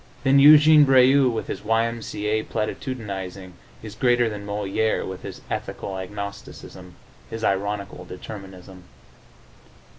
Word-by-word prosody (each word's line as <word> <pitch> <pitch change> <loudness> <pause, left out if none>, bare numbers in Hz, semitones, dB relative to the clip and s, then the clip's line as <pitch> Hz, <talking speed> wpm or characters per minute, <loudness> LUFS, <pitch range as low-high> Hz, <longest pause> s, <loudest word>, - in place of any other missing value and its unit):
Then 135 0 +4
Éugene 150 +1 +8
Brieux, 135 0 +5
with 115 - -3
his - - -6
Y. 115 +1 +1
M. 115 0 -5
C. 105 -1 -6
A. 110 +1 +1
platitudinizing, 100 -6 -5 0.3
is 110 -2 -8
greater 120 0 +2
than 105 -1 -8
Molière, 105 +2 -1
with 95 -1 -7
his - - -9
ethical 95 - -5
agnosticism, 95 -2 -9 0.3
his 115 0 -7
ironical 100 0 -2
determinism. 95 -2 -11
105 Hz, 125 wpm, -23 LUFS, 95-120 Hz, 0.3 s, Éugene